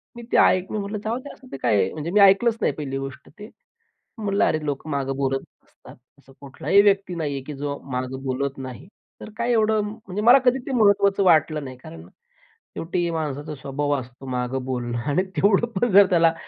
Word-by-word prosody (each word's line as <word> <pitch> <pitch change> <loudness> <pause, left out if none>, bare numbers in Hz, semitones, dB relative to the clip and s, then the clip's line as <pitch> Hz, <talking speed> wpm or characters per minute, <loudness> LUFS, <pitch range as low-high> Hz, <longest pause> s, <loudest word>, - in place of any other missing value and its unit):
मी 235 - -9
ते - - +3
ऐकलं. 185 +2 +3
मी 215 - -1
म्हटलं 205 +1 -4
जाऊद्या 250 +6 -4 0.2
ते - - -6
काय 120 - +1
आहे 95 - -1
म्हणजे 155 +2 -5
मी 210 - +3
ऐकलंच 200 +4 +5
नाही - - +1
पहिली 135 -2 -5
गोष्ट 135 -1 -8
ते, 210 - -9 0.7
म्हटलं 205 -2 +1
अरे 155 -1 -1
लोक 145 +1 -4
मागे 140 -2 -2
बोलत 135 -1 -1 0.2
असतात. - - -17 0.2
असा 135 -1 -20
कुठलाही 140 +8 +2
व्यक्ती 200 -2 +2
नाहीये 145 -5 -3
की 150 - -6
जो 140 +1 -4
माग 125 +1 -3
बोलत 135 +1 -2
नाही 130 +5 -8 0.3
तर - - -9
काय 235 +1 0
एवढं 220 -1 +2
म्हणजे 210 -1 -6
मला 245 +4 +7
कधी 250 +1 +4
ते - - -4
महत्त्वाचं 200 -4 +3
वाटलं 155 -3 +3
नाही 130 -1 -8
कारण 85 -8 -12 0.7
शेवटी 175 +1 -2
माणसाचा 150 -1 -4
स्वभाव 140 +2 -3
असतो 125 +1 -12
मागं 125 +1 -2
बोलणं 120 -2 -3
आणि 165 +6 +2
तेवढं 200 +3 +3
पण 240 +1 +1
जर 200 +1 +8
त्याला 165 -2 +4
155 Hz, 195 wpm, -23 LUFS, 135-200 Hz, 0.7 s, जर